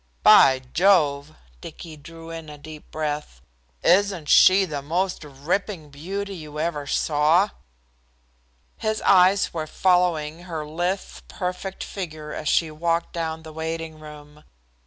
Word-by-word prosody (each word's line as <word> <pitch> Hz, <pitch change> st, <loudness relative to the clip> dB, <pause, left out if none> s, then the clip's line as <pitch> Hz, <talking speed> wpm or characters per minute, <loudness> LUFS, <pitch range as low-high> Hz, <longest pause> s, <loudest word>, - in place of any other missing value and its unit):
"By 130 Hz, -1 st, +7 dB
jove!" 155 Hz, -6 st, +2 dB, 0.3 s
Dicky 160 Hz, -2 st, -10 dB
drew 165 Hz, +2 st, -12 dB
in 165 Hz, -2 st, -8 dB
a 150 Hz, -, -10 dB
deep 155 Hz, +1 st, -12 dB
breath. 150 Hz, -, -4 dB, 0.4 s
"Isn't 190 Hz, -4 st, +2 dB
she 190 Hz, +1 st, +6 dB
the 150 Hz, -5 st, -5 dB
most 175 Hz, +5 st, -2 dB
ripping 150 Hz, +3 st, -4 dB
beauty 195 Hz, +7 st, -5 dB
you 155 Hz, -4 st, -9 dB
ever 155 Hz, -3 st, -2 dB
saw?" 155 Hz, +8 st, +2 dB, 1.3 s
His 215 Hz, -1 st, -2 dB
eyes 190 Hz, 0 st, +4 dB
were 160 Hz, -2 st, -4 dB
following 175 Hz, -3 st, +1 dB
her 160 Hz, -4 st, -5 dB
lithe, 175 Hz, +5 st, -2 dB, 0.3 s
perfect 185 Hz, +1 st, -5 dB
figure 155 Hz, -5 st, -7 dB
as 150 Hz, -, -3 dB
she 165 Hz, -2 st, +2 dB
walked 165 Hz, +2 st, -1 dB
down 160 Hz, -1 st, -4 dB
the 160 Hz, -1 st, -11 dB
waiting 160 Hz, 0 st, -5 dB
room. 150 Hz, 0 st, -13 dB
160 Hz, 130 wpm, -23 LUFS, 150-180 Hz, 1.3 s, By